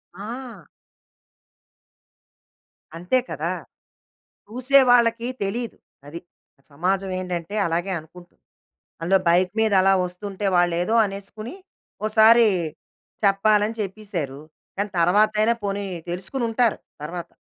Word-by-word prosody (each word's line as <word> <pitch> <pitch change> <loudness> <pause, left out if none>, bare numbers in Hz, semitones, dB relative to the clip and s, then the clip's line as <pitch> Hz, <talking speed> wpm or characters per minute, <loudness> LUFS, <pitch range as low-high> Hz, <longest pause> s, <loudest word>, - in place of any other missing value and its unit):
ఆ! 225 -1 -8 2.3
అంతే 180 +9 +1
కదా! - - -2 1.0
చూసేవాళ్ళకి 245 -2 +4 0.2
తెలీదు. 230 +4 -3 0.3
అది. 165 +4 -8 0.5
సమాజం 190 +6 -1
ఏంటంటే, 180 +1 -4
అలాగే 175 +3 -1
అనుకుంటుంది. 175 +3 -16 0.6
అందులో 190 +3 +3
బైకు 180 +2 +3
మీద 220 -1 +2
అలా 195 - +4
ఒస్తుంటే, 195 +2 -6
వాళ్ళేదో 175 +4 +2
అనేసుకుని 200 - -8 0.5
ఒసారి 225 +2 +6 0.8
చెప్పాలని 210 +2 +3
చెప్పిసారు. 190 -9 -5 0.4
కానీ, 205 +1 -1
తరవాతయినా 215 +5 +3
పోనీ 200 0 -2 0.3
తెలుసుకొనుంటారు 230 +5 -1 0.2
తర్వాత. 170 +2 -6
200 Hz, 85 wpm, -23 LUFS, 180-225 Hz, 2.3 s, ఒసారి